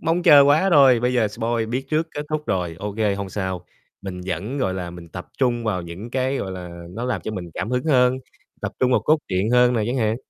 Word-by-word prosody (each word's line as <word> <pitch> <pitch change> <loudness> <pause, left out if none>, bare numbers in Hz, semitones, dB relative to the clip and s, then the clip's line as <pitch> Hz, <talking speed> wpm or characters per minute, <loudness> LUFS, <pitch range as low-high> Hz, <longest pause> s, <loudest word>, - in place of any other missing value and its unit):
mong 165 +2 0
chờ 145 -4 +8
quá 150 +7 +4
rồi, 135 -6 +6
bây 125 +1 +1
giờ 115 -4 +2
spoil 115 +1 -2
biết 125 +4 -3
trước 155 +2 +1
kết 145 - -3
thúc 155 0 -2
rồi, 90 -3 -2
OK, 100 +1 -5 0.2
hông 100 -1 -4
sao, 95 -2 -4 0.4
mình 95 -2 -6
vẫn, 95 - -3
gọi 95 -8 0
là, 90 -2 -5
mình 85 -1 -11
tập 90 +2 -8
trung 120 -3 +1
vào 95 -5 -1
những 85 +7 -8
cái, 130 +2 0
gọi 95 -7 -4
là, 90 -2 -8
nó 115 +6 -5
làm 125 - -1
cho - - -4
mình 90 -5 -6
cảm 95 - -3
hứng 125 0 -1
hơn, 130 -4 +3 0.4
tập - - -3
trung 130 - +3
vào 125 - +3
cốt 155 +1 +3
truyện 95 +3 0
hơn 125 0 +4
nè 110 - +1
chẳng 120 +3 -1
hạn. 110 -2 +1
115 Hz, 250 wpm, -22 LUFS, 95-130 Hz, 0.4 s, chờ